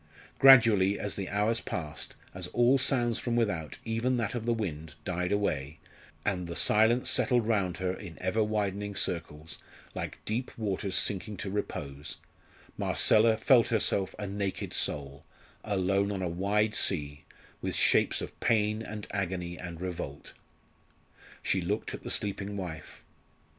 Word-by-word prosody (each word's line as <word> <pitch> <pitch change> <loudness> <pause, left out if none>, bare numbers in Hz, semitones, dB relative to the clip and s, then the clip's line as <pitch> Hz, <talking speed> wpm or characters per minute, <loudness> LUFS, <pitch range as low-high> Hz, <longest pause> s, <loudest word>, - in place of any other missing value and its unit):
Gradually, 110 -7 +7
as 105 - -3
the 95 -2 -4
hours 105 +3 +1
passed, 75 -4 -5 0.2
as 90 -1 -4
all 120 +7 +3
sounds 120 -4 +2
from 120 -1 -2
without, 90 -10 -1
even 115 +3 0
that 115 -4 -1
of 120 -1 -4
the - - +3
wind, 80 -9 -4
died 90 0 -2
away, 80 -8 -1 0.5
and 90 -3 -1
the 85 - -5
silence 110 +6 +3
settled 120 -3 +2
round 100 -6 0
her 90 +1 -1
in 90 -4 -9
ever 95 +4 +1
widening 105 -1 -2
circles, 80 -4 -3 0.3
like - - -5
deep 120 +4 -2
waters 100 -3 -2
sinking 105 +1 +1
to 95 - -4
repose, 75 -8 -5 0.6
Marcella 110 +1 +4
felt 120 -1 +5
herself 100 -4 +1
a 105 - -4
naked 100 -1 -3
soul, 70 -1 -2 0.4
alone 100 0 +1
on 95 -2 -3
a - - 0
wide 105 +5 +1
sea, 75 -9 +1 0.4
with - - -2
shapes - - +3
of - - -8
pain 110 -1 +1
and 105 -2 -6
agony 90 -3 -3
and 85 -2 -8
revolt. 85 -6 -6 1.1
She 95 - +1
looked 100 +5 -2
at - - -6
the - - -7
sleeping 100 0 -2
wife. 85 -5 -7
100 Hz, 150 wpm, -29 LUFS, 90-110 Hz, 1.1 s, Gradually